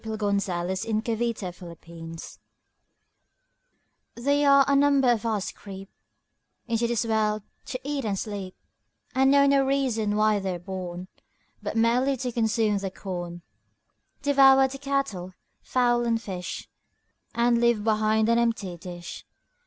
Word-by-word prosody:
Isaac 220 -1 -5
Watts 200 -2 0
Horace 185 +3 -2 0.2
Paraphrased 175 -7 -5 1.8
THERE 285 +4 +2
are 275 -1 +6
a 280 - +3
number 275 -2 +4
of 230 -1 0
us 210 -4 -1
creep 195 -1 -11 0.7
Into 235 0 0
this 235 -1 0
world 215 -2 0 0.2
to 255 - -5
eat 285 0 -3
and 205 -3 -1
sleep, 195 -3 -5 0.6
And 265 0 +4
know 280 0 +5
no 275 -1 +4
reason 255 -6 0
why 215 -1 +3
they're 190 -2 -3
born 180 0 -6 0.5
But - - -4
merely 250 +4 +2
to 250 0 -3
consume 220 -2 +1
the 195 -1 -3
corn, 175 -2 -6 0.8
Devour 270 -1 +6
the 275 +1 -8
cattle, 275 -10 -2 0.3
fowl 240 -1 +1
and 230 -1 +1
fish, 185 -5 -6 0.7
And 235 0 +3
leave 235 -3 +2
behind 220 0 +2
an 235 0 +3
empty 220 -7 -1
dish. 175 0 -8
220 Hz, 130 wpm, -26 LUFS, 190-255 Hz, 1.8 s, are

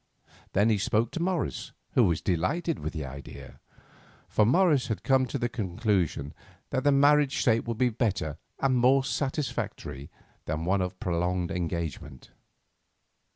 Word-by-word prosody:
Then 105 +3 +3
he 105 - +2
spoke 110 +3 +1
to 170 - -4
Morris, 175 -3 -2 0.2
who - - +4
was 85 -3 +1
delighted 145 - 0
with 80 +1 -4
the 80 -4 -5
idea. 70 +1 -10 0.7
For 105 - +3
Morris 145 -2 +3
had 110 -6 -3
come 130 -1 +3
to 140 - -3
the 120 -2 0
conclusion 95 - -1 0.4
that 130 - 0
the 145 - +4
marriage 145 0 +4
state 115 -1 +2
would 115 -2 -2
be 125 0 +3
better 100 - -2 0.2
and 130 -2 +2
more 130 +2 +4
satisfactory 130 - -3 0.4
than 80 +1 -3
one 95 +2 +2
of 90 0 -4
prolonged 90 0 -1
engagement. 80 -6 -4
110 Hz, 150 wpm, -28 LUFS, 85-135 Hz, 0.7 s, who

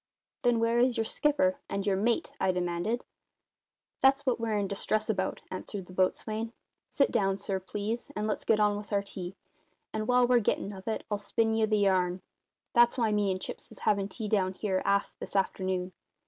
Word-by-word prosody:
"Then, 240 -1 +3
where 230 +1 +2
is 245 0 +3
your 225 - +2
skipper 285 +3 +1
and 200 0 -2
your 200 -2 +2
mate?" 225 +5 +1
I 190 - +3
demanded. 180 +6 -1 1.0
"That's 270 +1 +4
what 250 -3 +1
we're 225 -2 0
in 200 -1 0
distress 215 +2 0
about," 190 -2 -2
answered 190 +1 -5
the 185 - -13
boatswain. 215 +5 0 0.4
"Sit 275 - +2
down, 195 -1 +2
sir, 195 -1 -2
please, 210 +7 -4
and 210 - -1
let's 215 - -1
get 215 - +3
on 210 -1 +3
with 205 +1 -8
our 200 -1 +2
tea; 190 -2 -7 0.6
and 215 0 -2
while 250 0 +5
we're 245 0 +5
gettin' 205 -2 -1
of 190 +1 -11
it 220 - -1
I'll 205 - 0
spin 225 +2 +1
ye 220 0 +3
the 215 0 +2
yarn. 185 -2 +2 0.5
That's 240 +1 +5
why 225 -3 +2
me 205 -1 +2
and 185 0 -1
Chips - - -7
is - - -13
havin' 200 -1 +1
tea 215 +2 -5
down 190 -3 +1
here, 190 -2 -1
aft, 200 0 +2
this - - -7
afternoon. 185 -1 0
210 Hz, 200 wpm, -30 LUFS, 190-230 Hz, 1.0 s, while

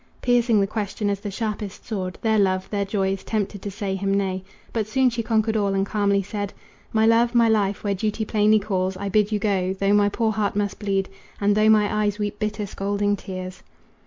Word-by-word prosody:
Piercing 240 -3 +3
the 200 - +3
question 205 0 -2
as 200 - -2
the 205 - -5
sharpest 210 0 -4
sword; 185 -4 -4
Their 220 -1 +3
love, 185 -1 +1
their 200 -1 0
joys, 195 -1 -1
tempted 205 -2 -2
to 205 - -4
say 200 -1 -3
him 195 +1 -1
nay. 190 -1 0 0.3
But 220 -3 -1
soon 260 +3 +2
she 235 0 -2
conquered 220 -1 +1
all 200 -2 +1
and 195 0 +1
calmly 200 -1 +1
said: 205 0 -4 0.4
"My 220 0 +3
love, 235 +2 +3
my 235 -1 +5
life, 205 -3 +1
where 200 -1 0
duty 215 +2 -2
plainly 215 0 +3
calls 190 -2 -1
I 200 - -3
bid 210 +1 +2
you 210 - +2
go, 195 -3 0
though 195 +1 +1
my 205 0 +4
poor 220 +1 0
heart 210 -2 -1
must 205 -1 -1
bleed, 195 -2 0 0.3
And 205 0 +3
though 215 +1 +4
my 210 -1 +5
eyes 210 -1 0
weep 205 -1 -3
bitter 210 -1 -2
scalding 205 +1 -1
tears." 185 -2 -7
205 Hz, 215 wpm, -23 LUFS, 195-215 Hz, 0.4 s, my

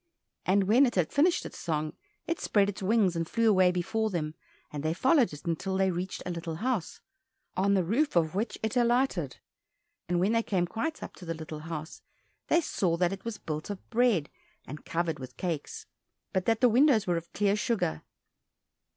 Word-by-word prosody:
And 195 +2 +4
when 235 +8 +5
it 240 - -3
had 180 -4 +1
finished 335 +5 +3
its - - -8
song, 155 -3 -2 0.3
it 335 +1 -2
spread 200 -1 +2
its 200 - -6
wings 195 -2 +2
and 165 0 -2
flew 230 -1 +2
away 185 -4 +5
before 215 +5 -1
them, 155 -5 -2 0.4
and 145 - -3
they 155 +2 -1
followed 260 - +4
it 150 -1 -10
until 190 +3 -1
they 190 -1 +2
reached 180 +2 -4
a 180 - -2
little 170 -1 -4
house, 225 - -2 0.5
on 200 +2 +2
the 190 - +2
roof 240 - +1
of 160 -2 +2
which 210 +5 -2
it 220 +1 -1
alighted; 240 - +1 0.7
and 175 0 +2
when 190 +4 +2
they 230 0 +3
came 190 -5 0
quite 230 - -3
up - - -7
to 180 - -10
little 160 -1 -6
house 160 0 -7 0.5
they 335 - +4
saw 180 - 0
that 180 +1 +1
it 195 0 -8
was 230 -2 -4
built 155 +2 -5
of 200 -2 -7
bread 230 - +2 0.3
and 150 +3 -9
covered 165 -2 -1
with 130 -1 -9
cakes, 180 - -4 0.5
but 190 -2 0
that 225 0 +2
the 250 - +6
windows 250 -2 +4
were 175 -2 +1
of 170 +1 -7
clear 205 0 +2
sugar. 210 - -1
190 Hz, 195 wpm, -29 LUFS, 165-230 Hz, 0.7 s, the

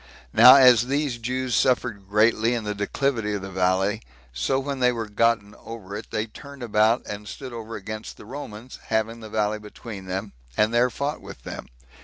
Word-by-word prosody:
Now 125 +4 +10
as 125 -3 +7
these 140 -3 -1
Jews 125 +1 -2
suffered 110 -7 +1
greatly 110 +3 +3
in 115 - -3
the 105 0 -2
declivity 105 +1 -1
of 100 - -5
the 95 - -7
valley, 95 +3 +1 0.3
so 65 - 0
when 135 0 -3
they 125 -1 +4
were 115 -2 -4
gotten 105 -1 +1
over 105 -4 -8
it, 105 - -7
they 110 - -1
turned 140 +4 -11
about, 110 +1 +2
and 105 0 -7
stood 130 +2 -8
over 115 -1 -7
against 110 +2 -7
the - - -12
Romans, 125 -2 -8
having 110 +1 -1
the 110 -1 -9
valley 105 0 0
between 105 -1 -9
them, 95 +3 -4 0.2
and 105 +2 +3
there 120 +1 +4
fought 140 +4 -3
with 60 - -11
them. - - -7
110 Hz, 190 wpm, -24 LUFS, 105-125 Hz, 0.3 s, Now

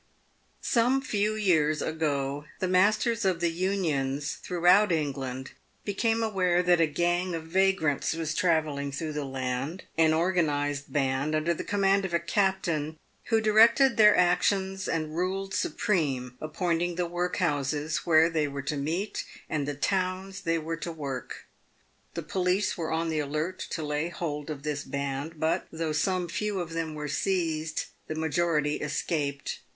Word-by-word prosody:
Some 245 +2 +3
few 215 -3 0
years 160 -8 +2
ago, 145 -2 -1
the 185 - -1
masters 215 +5 +3
of 185 -3 +1
the 170 -1 +1
Unions 155 -7 -1
throughout 180 +3 +4
Eng 155 -4 +1
land 130 -1 -6 0.3
became 225 +3 +1
aware 180 -5 +2
that 175 -1 +4
a 165 - +4
gang 175 +3 0
of 165 - -4
vagrants 175 -4 +1
was 160 -2 -2
travelling 155 -5 +1
through 155 +2 -4
the 150 -1 -2
land 135 +5 -3
— - - -36
an 160 -1 +5
organised 150 -4 0
band 135 +1 0
under 155 +2 +1
the - - -5
command 195 -1 +2
of 180 -3 -1
a - - +3
captain, 170 -4 0 0.3
who 225 -2 +2
directed 230 +4 +5
their 210 -1 +7
actions 190 +2 +2
and 155 -1 -2
ruled 190 +2 -2
supreme, 135 -10 -1
appointing 170 +2 -1
the 175 0 0
workhouses 160 -4 -1
where 160 -1 +4
they 160 -3 0
were 140 -1 -5
to 145 +2 -2
meet, 165 +9 -2 0.2
and 145 -3 -2
the 145 - -2
towns 185 +4 -1
they 165 0 +1
were 165 +1 -3
to 170 +1 -5
work. 140 -6 -6 0.7
The 170 - -3
police 185 +5 0
were 165 -2 -3
on 165 +1 0
the 155 -1 0
alert 155 +5 -2
to 160 - -3
lay 150 +2 -1
hold 150 -4 -4
of 145 -2 -5
this 150 -1 -2
band, 140 +3 -4
but, 160 +1 0
though 160 -1 -2
some 180 +3 0
few 205 +3 -2
of 170 -2 -4
them 165 -2 -3
were 150 0 -4
seized, 160 -1 -1 0.2
the 155 - -4
majority 160 -1 +1
escaped. 145 -1 -2
165 Hz, 160 wpm, -28 LUFS, 150-185 Hz, 0.7 s, their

